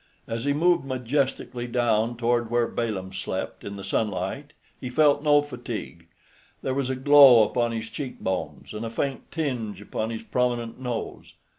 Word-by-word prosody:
As 115 +2 -3
he 145 - +2
moved 170 +3 +3
majestically 130 -1 -2
down 120 -1 +1
toward 120 -1 +1
where 120 0 +2
Balaam 100 -5 -3
slept - - -4
in 100 - -6
the 100 - -8
sunlight, 105 -2 -2 0.3
he 125 - -5
felt 145 +2 +4
no 145 -1 +4
fatigue. 120 - -7 0.6
There 130 - -1
was 135 -1 -1
a 130 - 0
glow 135 -3 +8
upon 120 +2 0
his 115 -1 -4
cheek 135 -4 -6
bones, 95 +2 -4
and 105 +1 -5
a 115 - -3
faint 135 +4 -3
tinge 125 - -3
upon 110 +2 -4
his 115 -1 -5
prominent 120 -1 -1
nose. 125 -3 -5
120 Hz, 165 wpm, -25 LUFS, 115-135 Hz, 0.6 s, glow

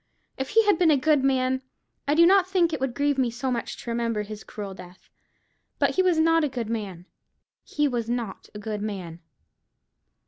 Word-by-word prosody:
If 265 0 -4
he 450 0 +4
had 410 -5 +3
been 345 -3 +4
a 300 - +5
good 295 0 +2
man, 260 -1 +1 0.5
I 290 - +2
do 335 +1 +7
not 375 +1 +5
think 350 -4 +2
it 305 - -2
would 260 -2 -2
grieve 285 -1 +1
me 250 -2 +2
so 245 +3 -3
much 235 -2 -3
to 235 - -4
remember 230 -2 -1
his 210 0 -8
cruel 200 -2 -7
death: 180 0 -14 0.7
but - - +2
he 375 - +2
was 365 -3 +2
not 330 0 +4
a 295 - +1
good 235 -4 -4
man—he 205 - -5
was 235 -4 -2
not 235 -5 -4
a - - -4
good 210 0 -4
man." 185 -6 -5
255 Hz, 200 wpm, -25 LUFS, 215-310 Hz, 0.7 s, do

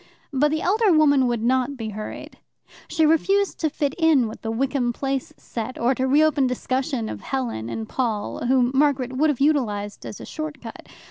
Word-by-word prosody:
But 290 +2 +3
the 310 +2 -1
elder 420 +2 +3
woman 285 -5 +4
would 235 -2 -1
not 260 +3 +1
be 225 -2 -4
hurried. 215 0 -8 0.5
She 320 -1 +2
refused 390 +6 +2
to 315 - +1
fit 285 -1 -1
in 310 -7 +4
with 220 - -9
the 225 - -4
Wickham 250 +1 0
Place 270 +1 -3
set, 230 +2 -6
or 240 +3 +2
to 260 0 -1
reopen 295 0 +3
discussion 255 -1 -2
of - - -6
Helen 240 - -3
and 110 -1 -4
Paul, 230 -2 -2
whom 250 -1 +3
Margaret 270 -2 +2
would 300 +4 +2
have 290 - -1
utilized 220 -9 0
as - - -8
a - - -8
short 310 -2 -6
cut. 230 -2 -10
265 Hz, 190 wpm, -23 LUFS, 235-295 Hz, 0.5 s, woman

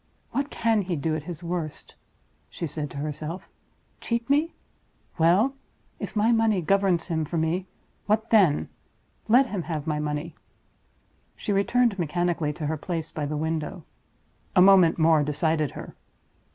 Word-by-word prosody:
"What 280 +1 -1
can 225 -2 +1
he 180 -2 -2
do 155 +1 -1
at 155 -1 -5
his 170 0 -7
worst?" 170 -3 -5 0.6
she - - -5
said 150 -1 -4
to - - -9
herself. 155 +4 -5 0.5
"Cheat 235 0 -2
me. 305 +4 +2 0.6
Well! 185 +11 +4 0.5
if - - -6
my 215 +2 +3
money 225 -3 +3
governs 185 0 +2
him 160 -3 -1
for 165 +3 -3
me, 165 +4 -1 0.4
what 220 +2 +1
then? 190 -10 +4 0.6
Let 245 +5 +6
him 205 -7 -3
have 160 -3 -4
my 150 -2 -1
money!" 150 +2 -3 1.0
She 205 - -2
returned 210 +1 +2
mechanically 170 -1 0
to 150 +1 -6
her 155 +2 -1
place 165 0 -4
by 150 -2 -3
the 150 +1 -3
window. 160 +2 -3 0.7
A - - +6
moment 190 -4 +6
more 160 -2 +4
decided 150 +1 0
her. - - -8
170 Hz, 150 wpm, -26 LUFS, 155-200 Hz, 1.0 s, Let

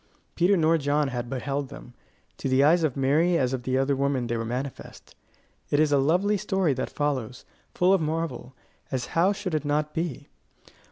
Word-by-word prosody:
Peter 185 +3 +3
nor 165 0 +3
John 145 0 +1
had 120 -2 -4
beheld 135 +1 -3
them: 125 -3 -11 0.4
to 135 - -3
the 130 +1 +4
eyes 165 +3 +4
of 145 -4 0
Mary 155 +6 +3
as 130 -3 0
of 130 - -2
the 130 +1 -1
other 135 +1 +1
women 135 -2 0
they 120 0 -2
were 115 - -2
manifest. 125 +4 -6 0.5
It 145 - +2
is 155 -1 +3
a 140 - +4
lovely 180 +9 +2
story 190 -6 0
that 130 - -3
follows, 130 -5 -3 0.3
full 180 +2 +4
of 195 - +3
marvel, 155 -5 -3 0.4
as 130 -2 -2
how 175 +4 +3
should 195 -3 -4
it 155 -2 0
not 150 +1 -1
be? 160 -5 -4
145 Hz, 190 wpm, -26 LUFS, 130-165 Hz, 0.5 s, the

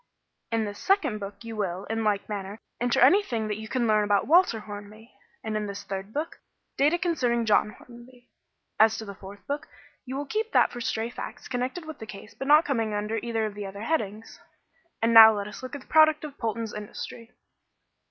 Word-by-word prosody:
"In 225 -1 +1
this 205 0 -7
second 310 - +1
book 200 +2 -8
you 230 -1 -7
will, 190 -2 -3
in 225 0 -2
like 205 -2 0
manner, 205 0 -5 0.2
enter 245 0 +1
anything 255 - +4
that 210 0 -3
you 220 - -7
can 245 +1 0
learn 215 -1 +3
about 205 -1 +2
Walter 320 -8 +4
Hornby, 210 +2 -10 0.3
and, 220 -1 -3
in 210 -1 -2
the 200 - -6
third 195 0 -6
book, 305 +7 -4 0.4
data 295 +5 +3
concerning 255 -10 0
John 210 0 +3
Hornby. 240 +2 -16 0.5
As 220 0 +5
to 220 - -6
the 200 - -7
fourth 200 +1 -12
book, 285 +1 -4 0.4
you 260 0 -6
will 290 - -3
keep 435 +9 -3
that - - +4
for 240 - -7
stray 230 0 -2
facts - - -8
connected 260 +7 -3
with 315 -2 -8
the 220 - -8
case 210 0 -10
but 270 - -6
not 305 +3 +6
coming 225 -8 -1
under 210 +2 -2
either 225 -1 -2
of 215 - -4
the 205 -1 -6
other 200 +1 -8
headings. 220 -7 -3 0.6
And 230 +1 +3
now 220 -1 +10
let 200 0 -3
us 210 - -9
look 255 +1 -7
at 285 - -7
the - - -19
product 310 -1 +5
of 295 -2 -7
Polton's 225 -1 -3
industry." 210 +2 -8
225 Hz, 210 wpm, -27 LUFS, 210-260 Hz, 0.6 s, now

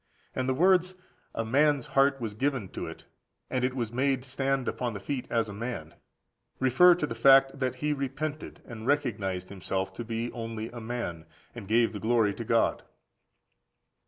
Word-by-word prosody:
And 130 0 -1
the 130 - +1
words, 185 +3 +3 0.4
"a 115 - -1
man's 140 +3 +3
heart 135 0 +4
was 110 -4 -4
given 130 -3 -1
to - - -5
it, - - -10 0.5
and 130 -1 0
it 130 0 0
was 120 -4 -2
made 130 +1 0
stand 135 0 -1
upon 120 -3 -2
the - - -4
feet 125 +5 -4
as 115 -1 +1
a 105 - -7
man," 100 -8 -5 0.7
refer 150 +8 +6
to 175 - -1
the 115 - -5
fact 135 +3 +5
that 130 -1 -1
he 150 +3 -1
repented 145 +2 -4
and 115 -1 -8
recognised 105 -10 0
himself 95 0 -3
to 120 - -5
be 115 +1 -3
only 115 -1 -5
a 120 - -8
man, 110 -8 -5 0.3
and 100 - -9
gave 115 +2 +3
the 105 - -5
glory 110 -2 +2
to 115 - -6
God. 115 0 +2
120 Hz, 180 wpm, -28 LUFS, 110-135 Hz, 0.7 s, refer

